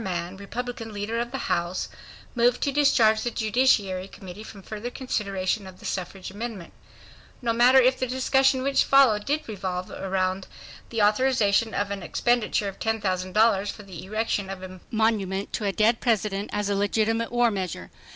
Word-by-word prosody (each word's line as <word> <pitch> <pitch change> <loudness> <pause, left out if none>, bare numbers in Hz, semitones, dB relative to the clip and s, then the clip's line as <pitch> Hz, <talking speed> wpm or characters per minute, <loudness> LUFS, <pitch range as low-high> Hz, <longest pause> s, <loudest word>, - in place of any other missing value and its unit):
Mann, 175 -1 -3
Republican 225 +2 -6
leader 210 +3 -3
of 240 0 -2
the 270 - -3
House, 175 +2 -1 0.5
moved 245 0 +2
to 280 - +1
discharge 235 -6 +4
the 240 - -1
Judiciary 215 -5 +1
Committee 190 0 -10
from 210 -2 -11
further 215 +4 -5
consideration 200 -6 -2
of 185 -1 -12
the - - -13
suffrage 185 +1 -4
amendment. 205 -3 -6 0.7
No 235 -2 0
matter 245 +3 +6
if 255 0 +3
the 255 - 0
discussion 260 +1 +2
which 275 0 +3
followed 250 -7 +4
did 295 +2 -1
revolve 185 -4 -4
about 190 0 -2 0.4
the 225 -3 0
authorization 220 -1 +2
of 200 0 -1
an 200 -1 -4
expenditure 240 0 0
of 195 - -7
$10,000 205 0 +1
for 210 - -11
the 185 -5 -9
erection 210 -1 -2
of 190 -1 -6
a 185 0 -9
monument 205 -3 0
to 215 - -2
a 200 - +1
dead 220 +3 +2
President 210 -4 0
as 205 -1 -1
a 205 - 0
legitimate 220 +3 0
war 240 -1 +3
measure. 190 -4 -4
215 Hz, 170 wpm, -25 LUFS, 195-240 Hz, 0.7 s, matter